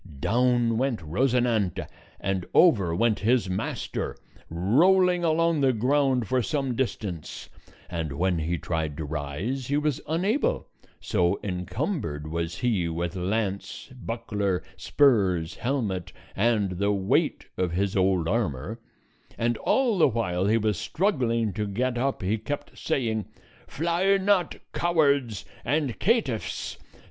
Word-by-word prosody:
Down 120 - +2
went 130 -3 0
Rosinante, 115 - +1 0.3
and 95 -1 -2
over 100 - +5
went 115 +2 +2
his 115 0 +2
master, 95 - -3 0.3
rolling 175 - +3
along 165 -1 +2
the 135 -2 +4
ground 130 0 +2
for 130 +4 +2
some 135 -2 -1
distance; 105 - -4 0.4
and 80 -5 -3
when 90 +3 +1
he 85 +3 -1
tried 80 -2 -3
to 80 - -4
rise 80 - -3
he 145 - +1
was 150 -2 0
unable, 195 - 0 0.3
so 90 +1 +1
incumbered 90 - -3
was 85 +2 -3
he 105 -9 +1
with 85 +1 -3
lance, 100 +5 -3
buckler, 105 -6 -2
spurs, 95 - +2
helmet, 115 -9 -2 0.2
and 100 -4 +1
the 100 +1 +2
weight 95 -2 +1
of 90 -2 -1
his 95 +2 0
old 95 -3 +2
armor; 105 - -1 0.6
and 120 +1 +1
all 245 -7 +2
the 160 - +6
while 95 -7 0
he 110 +2 +4
was 105 -5 0
struggling 120 - 0
to 105 -1 -2
get 120 +4 -1
up, 135 -5 -1
he 105 +4 0
kept 145 +6 -5
saying, 115 -8 -1 0.4
"Fly 170 +5 +2
not, 190 -3 +2 0.2
cowards 140 - +1 0.2
and 135 -4 -1
caitiffs! 200 - 0
115 Hz, 130 wpm, -26 LUFS, 90-135 Hz, 0.6 s, the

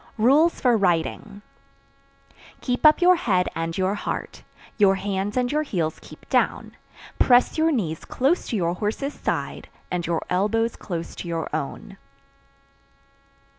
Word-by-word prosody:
Rules 285 +9 +4
for 245 -2 +3
Riding. 200 +2 -1 1.2
Keep 250 +4 +3
up 305 +4 +4
your 360 0 +6
head 185 - +1
and 165 0 -3
your 190 +1 +1
heart, 210 - -5 0.4
Your 195 -2 +5
hands 200 +2 -3
and 245 -1 +1
your 300 +1 +1
heels 175 - -2
keep - - -15
down, - - 0 0.4
Press 245 0 +4
your 320 +1 +2
knees 170 - -2
close 280 +8 0
to 235 - -3
your 170 -4 0
horse's 215 +10 -3
side, - - -4 0.2
And 175 -2 -2
your 170 -1 -1
elbows 220 +5 0
close 170 -4 -6
to - - -6
your 165 -2 -3
own. 160 +6 -6
205 Hz, 140 wpm, -24 LUFS, 175-250 Hz, 1.2 s, your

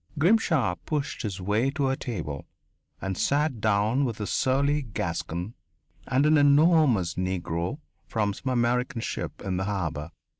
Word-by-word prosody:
Grimshaw 160 - +3
pushed 150 -2 -2
his 100 -4 -4
way 105 +7 +1
to 140 -1 0
a 135 - +1
table 80 - -5 0.5
and 95 -1 -3
sat 145 - 0
down 110 +5 +2
with 115 -5 -2
a 105 - -2
surly 140 +6 +1
Gascon 95 - -4 0.5
and 135 +3 +2
an 155 0 +5
enormous 145 - +4
Negro 90 - -2 0.3
from 105 -3 0
some 130 - -5
American 125 0 +1
ship - - -5
in 95 -2 -1
the 95 - -1
harbour. 85 -7 -3
115 Hz, 145 wpm, -27 LUFS, 95-140 Hz, 0.5 s, an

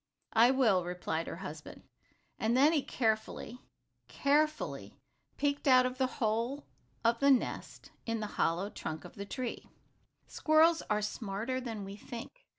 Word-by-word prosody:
"I 230 +2 +6
will," 230 -9 +3
replied 175 -2 -3
her - - -4
husband. 155 -3 -9 0.6
And 225 +3 +2
then 290 +5 +6
he 300 - +3
carefully, 225 0 -2 0.5
carefully 305 +2 0 0.4
peeked 285 0 0
out 255 -1 +7
of 255 +1 -3
the 260 - +3
hole 230 +5 -1 0.4
of 230 0 +3
the 280 - +4
nest 265 -3 0 0.2
in 230 0 -1
the 215 - -2 0.2
hollow 180 +5 +1
trunk 160 0 -6
of - - -11
the 200 - -7
tree. 250 +1 -5 0.6
Squirrels 320 +1 +4
are 210 0 +1
smarter 215 +4 -3
than 225 -5 -5
we 195 +1 -8
think. 230 +2 -8
235 Hz, 150 wpm, -32 LUFS, 210-270 Hz, 0.6 s, out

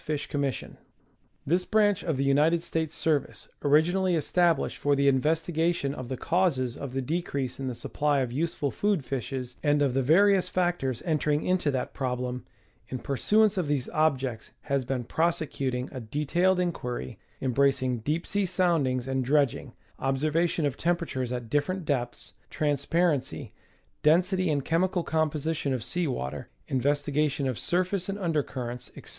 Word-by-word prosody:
Fish 150 -1 -2
Commission. 140 -4 -3 0.7
This 175 +5 +2
branch 210 0 +2
of 160 -5 -1
the 135 - +1
United 150 +5 +3
States 160 -2 -2
service, 155 -3 -1
originally 175 +5 +3
established 165 0 +1
for 145 0 +2
the 140 0 +2
investigation 160 +2 +1
of 130 -4 -7
the 130 - -3
causes 145 -9 +1
of 140 -3 -6
the 135 0 -1
decrease 140 -4 -2
in 135 - -3
the 125 - -3
supply 145 +3 0
of 125 -2 -2
useful 145 0 -1
food 200 -9 0
fishes 130 -1 -4
and 145 0 +3
of 135 -3 +1
the 135 - +2
various 190 +7 +4
factors 175 -9 -1
enter 155 -3 0
ing 150 0 +1
into 180 -4 +1
that 130 -3 -2
problem, 125 -1 -3 0.5
in 130 - -3
pursuance 205 - +2
of 170 - -1
these 145 -4 -1
objects 135 -7 0
has 140 -2 -1
been 130 -1 -2
prose 165 +7 +1
cuting 130 -5 -3
a 130 - -6
detailed 150 +10 +1
inqixiry, 125 - -3 0.2
embracing 130 -1 +1
deep 150 +9 -2
sea 200 -1 0
soundings 160 -9 +1
and 135 0 0
dredging, 140 0 +1 0.3
observation 155 +5 +1
of 140 - -1
temperatures 165 -8 -1
at 125 -2 -4
different 155 +8 -1
depths, 130 -5 -3 0.2
trans 145 -2 -1
parency, 165 -5 0 0.5
density 180 +3 +3
and 145 -3 0
chemical 175 +2 +1
composition 155 -3 0
of 120 - -4
sea 175 -2 -1
water, 75 - -4 0.2
investi 145 +2 0
gation 145 -2 +1
of 130 -4 -2
surface 185 +1 0
and 195 - -2
under 165 -6 +1
currents, 125 -2 -6
etc. - - -11
145 Hz, 160 wpm, -27 LUFS, 130-170 Hz, 0.7 s, various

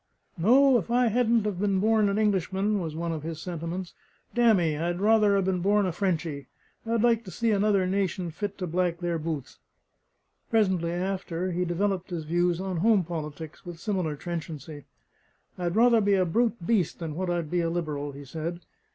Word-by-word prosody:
"No, 250 +8 +5
if 195 - -7
I 245 0 +3
hadn't 235 -1 +2
have 200 -4 -2
been 195 -1 +1
born 215 0 +3
an 200 - 0
Englishman," 200 0 +1
was 160 -4 -4
one 170 +1 -2
of 160 -2 -4
his 160 0 -5
sentiments, 170 +1 -5 0.4
"damn 235 -3 +5
me! 165 -4 +1
I'd 175 +3 -2
rather 210 0 +4
'a 195 - +2
been 185 -1 0
born 205 +2 +3
a 185 - 0
Frenchy! 165 -6 -2 0.4
I'd 230 0 +1
like 235 -1 +3
to - - -8
see 230 +4 0
another 200 -2 +2
nation 185 -2 -1
fit 205 +4 -5
to 185 - -3
black 175 0 0
their 170 -1 -2
boots." 150 -5 -5 0.9
Presently 190 -7 +2
after, 180 0 -2
he 180 +1 -1
developed 190 +2 -1
his 170 -3 -4
views 175 +2 +1
on 190 -2 -3
home 205 +2 +4
politics 155 -1 -7
with 175 -2 -8
similar 180 -6 -1
trenchancy. 155 -2 -6 0.7
"I'd 175 -1 -2
rather 230 0 +5
be 200 -1 +3
a 185 -1 +2
brute 225 +2 0
beast 205 -3 +1
than 165 -3 -5
what 180 +3 -3
I'd 170 -3 -2
be 175 -1 +1
a 165 - 0
liberal," 150 -4 -3
he 140 +1 -10
said. 165 +5 -5
180 Hz, 190 wpm, -27 LUFS, 165-205 Hz, 0.9 s, No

